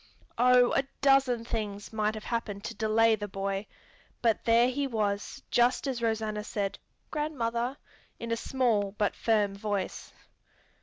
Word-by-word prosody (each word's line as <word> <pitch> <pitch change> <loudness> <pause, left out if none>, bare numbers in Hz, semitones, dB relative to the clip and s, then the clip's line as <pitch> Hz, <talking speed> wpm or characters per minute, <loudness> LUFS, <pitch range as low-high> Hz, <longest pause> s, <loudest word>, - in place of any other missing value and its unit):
Oh, 250 0 +6
a - - +4 0.2
dozen 270 -4 +3
things 210 -3 -4
might 215 0 0
have 215 - -7
happened 210 -4 -3
to 230 - -4
delay 225 +1 +3
the 205 -1 -5
boy, 195 +1 -3 0.6
but 225 -3 +2
there 235 +1 +5
he 275 +2 -1
was 215 +2 -2
just 245 +3 +3
as 260 -4 -2
Rosanna 220 -2 -1
said, 200 -2 -3 0.3
"Grandmother!" 255 -4 -2 0.4
in 230 0 -6
a - - +2
small 230 -5 0
but 205 -2 +1
firm 210 -3 +1
voice. 200 -1 -3
225 Hz, 145 wpm, -29 LUFS, 205-245 Hz, 0.6 s, Oh